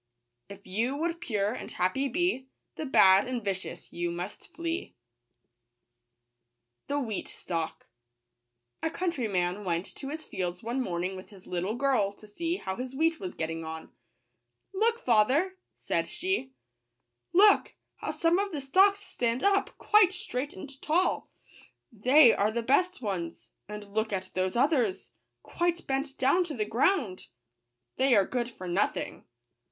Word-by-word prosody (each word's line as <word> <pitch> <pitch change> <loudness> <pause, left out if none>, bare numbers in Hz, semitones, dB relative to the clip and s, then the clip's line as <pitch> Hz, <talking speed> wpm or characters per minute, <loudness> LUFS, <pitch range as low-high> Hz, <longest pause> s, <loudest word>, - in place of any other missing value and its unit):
If 200 0 -11
you 230 +8 -1
would 335 +3 -2
pure 210 -9 0
and - - -7
happy 225 +10 0
be, 275 -2 0 0.3
The 310 - -4
bad 195 -4 +6
and 250 -3 -3
vicious 190 -1 -4
you 175 0 -1
must 175 +4 -6
flee. 335 0 -3 1.9
wWffCTAmlrrri/r/i 205 - -3 1.1
'.^luiw.trxyw^ 320 - -1
COUNTRYMAN 210 - -1
went 175 -1 -1
to 270 - -6
his 310 +2 -6
fields 180 0 -4
one 240 +4 -1
morning 180 -3 -2
with 185 - -10
his 195 -3 -15
little 185 +5 -2 0.4
to 215 - -16
see 335 - -2
h° - - -14
w 250 +7 -4
wheat 325 +1 +2
was 185 -2 -6
^ - - -29
getting 165 0 -3
on. 160 0 -7 0.4
" - - -52
Look, 455 +4 +1
father 265 - +3
!" - - -53
said - - -1
she; 360 -9 -2 0.4
" - - -54
look, 405 +4 +5 0.2
how - - -5
some 335 +2 +2
of 400 0 -1
the 295 -4 -3
stalks 390 +9 +4
stand 240 - -2
up, 400 0 +2
quite 420 -4 +5
straight 265 -6 -3
and 270 +7 -10
tall! 350 +4 +1 0.3
— - - -24 0.2
they 255 +4 +6
are 205 +1 +2
the 235 +1 -2
best 355 +5 +2
ones; 175 -5 -4 0.2
and 210 -1 -8
look 220 0 0
at 190 -2 -3
those 185 +2 -1
others, 250 - +1 0.3
quite 345 0 -1
bent 270 +1 -2
down 275 +8 +3
to 310 -4 -5
the 215 -3 -1
ground! 230 - +1 0.3
— 120 0 -55
they 260 -1 +4
are 200 -2 +5
good 240 +1 -2
for 185 -6 -9
nothing." 185 +4 -1
245 Hz, 155 wpm, -29 LUFS, -, 1.9 s, bad